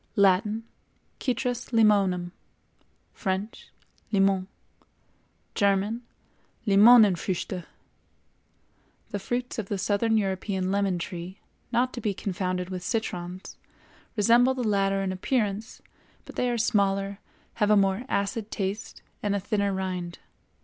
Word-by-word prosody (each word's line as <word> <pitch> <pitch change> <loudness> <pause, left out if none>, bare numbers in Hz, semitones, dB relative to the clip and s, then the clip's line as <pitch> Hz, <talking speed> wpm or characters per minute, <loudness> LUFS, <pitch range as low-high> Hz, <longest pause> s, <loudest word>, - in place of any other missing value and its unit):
Latin—Citrus 225 +5 -1
Limonum; 200 -6 +3 0.8
French—Limon; 195 -1 -2 1.1
German—Limonenfrüchte. 200 -2 +2 1.5
The 205 - -2
fruits 245 +4 -3
of 205 - -4
the 205 - -1
South 200 +1 0
European 195 -4 0
lemon 200 -2 +1
tree, 175 +1 -6 0.3
not 250 +1 +1
to 240 - -5
be 205 -2 -1
confounded 185 -1 -3
with 185 -1 -4
citrons, 185 -4 -4 0.6
resemble 235 +5 +4
the 255 - -2
latter 195 -1 +1
in 190 - -1
appearance, 210 +2 -2 0.4
but - - -11
they 250 - +1
are 240 - 0
smaller, 200 -3 +1 0.4
have 210 - +4
a 210 - +6
more 195 +1 +2
acid 205 +2 -1
taste 200 +2 -4 0.2
and 205 -1 0
a - - 0
thinner 200 0 0
rind. 185 -2 -3
200 Hz, 105 wpm, -27 LUFS, 190-220 Hz, 1.5 s, a